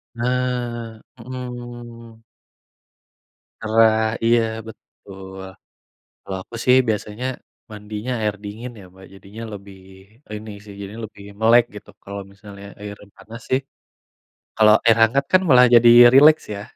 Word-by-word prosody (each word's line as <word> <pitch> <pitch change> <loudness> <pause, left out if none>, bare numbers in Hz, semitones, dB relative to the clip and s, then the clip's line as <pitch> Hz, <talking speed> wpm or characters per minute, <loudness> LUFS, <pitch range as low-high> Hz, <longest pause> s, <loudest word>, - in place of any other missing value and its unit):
Nah, 120 -2 -3 0.2
hmm. 120 -2 -10 1.4
Gerah, 110 0 +3 0.3
iya, 115 0 +4 0.3
betul. 95 -3 -13 0.9
Kalau 95 - -6
aku - - -15
sih 125 0 +5
biasanya, 105 +3 -3 0.4
mandinya 105 +3 -6
air 105 -1 -1
dingin 110 +5 -7
ya 100 - -13
Mbak 95 0 -16
jadinya 100 +3 -12
lebih 100 -1 -12 0.6
ini 110 +1 -8
sih, 105 - -12
jadinya 100 +3 -8
lebih 100 -1 -16 0.2
melek 115 +2 +5
gitu. 105 - -12
Kalau 100 0 -7
misalnya 100 0 -13
air 105 0 -8 0.2
panas 115 +2 -12
sih, 130 +1 +2 1.3
air 115 -1 +5
hangat 135 +5 +3
kan 185 - +6
malah 125 -2 +7
jadi 120 0 +7 0.2
rileks 150 +3 +6
ya. 100 - -7
115 Hz, 120 wpm, -20 LUFS, 105-120 Hz, 1.4 s, malah